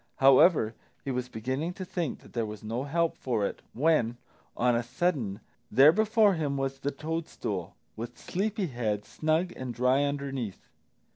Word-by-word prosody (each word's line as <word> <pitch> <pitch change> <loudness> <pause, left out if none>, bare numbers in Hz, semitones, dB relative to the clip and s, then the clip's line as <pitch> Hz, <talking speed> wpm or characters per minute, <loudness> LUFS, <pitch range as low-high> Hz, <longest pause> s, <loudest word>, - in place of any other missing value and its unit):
However, 135 -3 +6 0.3
he 135 - -1
was 125 0 -2
beginning 130 +10 -3
to 185 - -6
think 170 -6 -3
that - - -17
there 115 -2 -1
was 105 0 -8
no 115 +5 -3
help 165 +3 +1
for 115 -6 -1
it, - - -4
when, 125 -4 +2 0.4
on 125 0 +3
a 120 - +2
sudden, 120 - -1 0.3
there 135 +7 +7
before 215 +1 +4
him 145 -5 -1
was 135 0 -2
the 140 - -1
toadstool, 160 +3 -4 0.2
with 120 +2 -7
Sleepy 205 +2 -2
head 110 - -2
snug 160 +3 0
and 125 -2 -5
dry 125 +3 +3
underneath! 140 -7 -3
135 Hz, 160 wpm, -29 LUFS, 120-160 Hz, 0.4 s, there